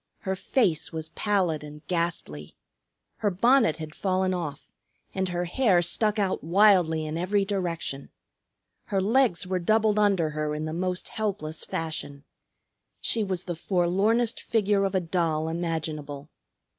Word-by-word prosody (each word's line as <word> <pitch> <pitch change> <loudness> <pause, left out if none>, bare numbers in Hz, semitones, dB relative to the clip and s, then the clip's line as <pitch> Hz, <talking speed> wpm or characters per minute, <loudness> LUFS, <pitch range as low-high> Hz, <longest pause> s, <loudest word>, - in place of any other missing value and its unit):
Her 190 0 -2
face 190 - +1
was 160 -1 -5
pallid 185 -8 0
and 150 +1 -11
ghastly. 165 - -3 0.6
Her 210 - +1
bonnet 230 - +3
had 155 -1 -7
fallen 185 0 0
off, 160 -6 -5 0.4
and 190 -1 -1
her 175 0 -1
hair 180 -2 +3
stuck 210 +5 0
out 195 -3 0
wildly 175 -3 +4
in 155 +2 -3
every 195 +3 +1
direction. 170 -8 -3 0.8
Her 200 -4 0
legs 215 -2 +2
were 185 0 -1
doubled 215 +3 +2
under 195 -7 +2
her 150 0 -2
in 155 +1 -3
the 155 - -4
most 180 +1 -2
helpless 195 -8 -3
fashion. 150 -3 -5 0.8
She 225 - +1
was 185 -3 -2
the 175 - -4
forlornest 195 +7 +1
figure 205 -3 +1
of 195 0 -1
a - - +4
doll 165 -2 0
imaginable. 155 -3 -4
180 Hz, 145 wpm, -27 LUFS, 160-200 Hz, 0.8 s, wildly